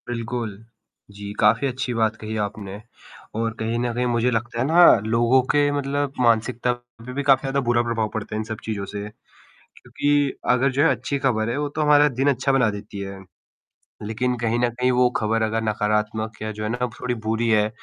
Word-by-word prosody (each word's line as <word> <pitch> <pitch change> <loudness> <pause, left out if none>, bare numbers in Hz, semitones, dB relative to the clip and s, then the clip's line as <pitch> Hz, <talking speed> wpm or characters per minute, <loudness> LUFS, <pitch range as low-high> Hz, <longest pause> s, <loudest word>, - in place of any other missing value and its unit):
बिल्कुल, 120 -1 -3 0.6
जी, 100 0 -8
काफ़ी 115 +6 +4
अच्छी 130 -1 -3
बात 110 -1 +1
कही 110 0 -5
आपने 100 0 -6 0.6
और 115 -1 -1
कहीं 115 +1 -1
न 120 0 -1
कहीं 125 +1 -1
मुझे 120 0 +1
लगता 115 +1 -2
है 125 - +1
ना 170 +3 +6 0.2
लोगों 120 +3 +3
के 145 0 +3
मतलब 145 0 -1
मानसिकता 120 +1 +2
पर 120 0 -13
भी 140 +2 -2
काफ़ी 135 -1 +4
ज़्यादा 135 0 -1
बुरा 120 0 +3
प्रभाव 115 -2 -1
पड़ता 105 -1 -4
है - - -1
इन - - -2
सब 110 0 -6
चीज़ों 105 -3 -3
से, 100 +1 -6 0.6
क्योंकि 145 -1 -1 0.2
अगर 130 +2 +2
जो 140 +2 +2
है 165 - +5
अच्छी 140 - -3
खबर 115 -5 0
है, 120 - -2
वो 145 0 -1
तो 155 +2 -3
हमारा 150 0 +5
दिन 135 +1 0
अच्छा 135 +1 0
बना 125 -5 +3
देती 105 0 -8
है। 100 0 -6 0.9
लेकिन 120 +4 -1
कहीं 115 0 0
न 120 0 +2
कहीं 125 0 +3
वो 125 0 +4
खबर 115 +1 0
अगर 110 +1 0
नकारात्मक 105 +1 -1
या 110 0 -3
जो 105 0 -6
है 105 - -2
ना 125 +2 -1
थोड़ी 125 -1 -2
बुरी 115 +1 0
है, 105 -1 +3
120 Hz, 205 wpm, -23 LUFS, 110-130 Hz, 0.9 s, ना